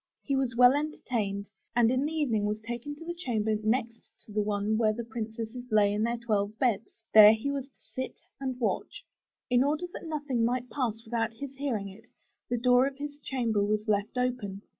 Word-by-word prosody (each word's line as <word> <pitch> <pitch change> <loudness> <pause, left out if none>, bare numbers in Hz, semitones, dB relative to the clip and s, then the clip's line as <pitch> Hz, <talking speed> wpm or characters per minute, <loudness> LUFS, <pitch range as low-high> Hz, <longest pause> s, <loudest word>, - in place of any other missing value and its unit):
He 275 - 0
was 260 -3 0
well 250 +1 +7
entertained, 235 -9 -2 0.3
and 235 -1 +5
in 260 +2 +1
the - - -4
evening 255 -10 +1
was 210 +1 -1
taken 240 +5 -5
to 325 +3 -11
the 345 - -3
chamber 225 -10 -1
next 230 +1 -1 0.2
to - - -13
the 210 0 +1
one 205 +1 0
where 215 -1 +3
the 235 +2 -4
princesses 225 +1 -5
lay 210 -2 +4
in 210 - -1
their 235 +2 +1
twelve 215 -2 -1
beds. 230 -5 +1 0.2
There 215 0 +10
he 225 +6 -2
was 275 -2 -3
to 275 - -29 0.2
sit 260 0 -4 0.2
and 260 -2 -3
watch. 235 - -2 0.5
In 250 +1 +5
order 300 +5 0
that 340 - -7
nothing 290 -6 -1
might 245 +1 0
pass 230 -4 -2
without 225 0 -1
his 280 +2 -7
hearing 245 -8 -2
it, 210 +5 -13 0.4
the 245 - 0
door 250 +2 +4
of 275 -1 -6
his 290 0 -6
chamber 235 -7 0
was 210 +1 0
left 210 +3 0
open. 240 -6 -2
235 Hz, 205 wpm, -29 LUFS, 215-260 Hz, 0.5 s, There